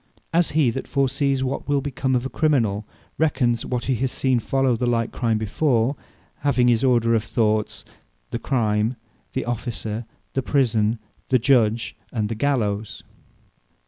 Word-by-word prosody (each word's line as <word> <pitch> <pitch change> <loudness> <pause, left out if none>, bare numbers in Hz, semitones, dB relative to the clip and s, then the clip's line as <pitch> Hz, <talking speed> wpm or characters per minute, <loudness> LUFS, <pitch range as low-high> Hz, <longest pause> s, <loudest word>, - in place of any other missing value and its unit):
As 170 0 +3
he 140 -7 +4
that 135 - -5
foresees 140 0 +1
what 130 +1 -3
wil 145 -1 +3
become 130 -1 -1
of 125 +1 0
a - - -2
Criminal, 115 -11 +1 0.3
re 160 0 +4
cons 120 -4 0
what 125 -1 -2
he 135 - +1
has 130 +1 -1
seen 130 -2 +1
follow 135 +3 +1
on 120 - +1
the 125 - -1
like 115 -1 +1
Crime 115 -2 0
before; 115 +3 +1 0.4
having 130 -4 +2
this 120 -1 +3
order 120 -3 +3
of 110 -2 +2
thoughts, 110 -2 0 0.5
The 115 - -2
Crime, 110 -2 +1 0.4
the 130 - -2
Officer, 115 -1 -4 0.3
the 135 - 0
Prison, 115 -5 +1 0.3
the 130 - +5
Judge, 115 -3 +2 0.2
and 105 -3 -1
the 115 - -2
Gallowes. 110 -5 -1
120 Hz, 165 wpm, -23 LUFS, 110-135 Hz, 0.5 s, the